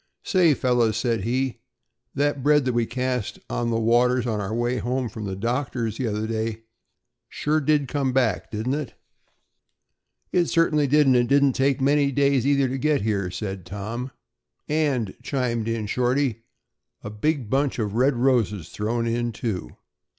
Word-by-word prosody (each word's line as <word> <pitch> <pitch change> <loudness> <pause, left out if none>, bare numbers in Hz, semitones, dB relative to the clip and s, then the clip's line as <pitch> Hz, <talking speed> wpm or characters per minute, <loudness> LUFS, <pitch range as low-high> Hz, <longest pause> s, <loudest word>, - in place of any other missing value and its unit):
"Say, 175 -6 +3
fellows," 120 -4 +1
said 115 -3 -1
he, 130 +2 -1 0.6
"that 145 0 0
bread 150 0 +3
that 125 - 0
we 120 -1 +1
cast 125 -4 -2
on 120 -1 -1
the 115 -1 0
waters 120 +2 +3
on 110 -3 -1
our 100 +1 -4
way 120 +2 0
home 125 +3 -1
from 105 0 -7
the 95 -1 -4
doctor's 115 0 -2
the 130 - 0
other 105 0 -2
day 110 0 -3 0.7
sure 155 +1 0
did 145 -1 +2
come 135 -1 -1
back, 125 -7 0
didn't 110 +5 -2
it?" 150 -3 -4 1.4
"It 175 -1 +3
certainly 155 -4 +2
did 150 +2 +4
and 130 -1 +4
it 120 -1 +3
didn't 140 0 +4
take 135 +1 +1
'many 140 +1 +3
days' 140 -1 +2
either 140 -1 +3
to 130 +1 -3
get 150 +1 +1
here," 100 -4 0
said 95 0 -5
Tom. 105 +8 -5 0.6
"And," 140 -9 0
chimed 120 -5 -1
in 115 -2 -2
Shorty, 125 0 0 0.6
"a 105 - -6
big 130 +4 -1
bunch 135 0 +1
of 105 -4 -2
red 130 +4 +2
roses 115 -9 +1
thrown 115 +3 -2
in, 120 +1 -1
too." 105 - -4
125 Hz, 165 wpm, -24 LUFS, 110-140 Hz, 1.4 s, did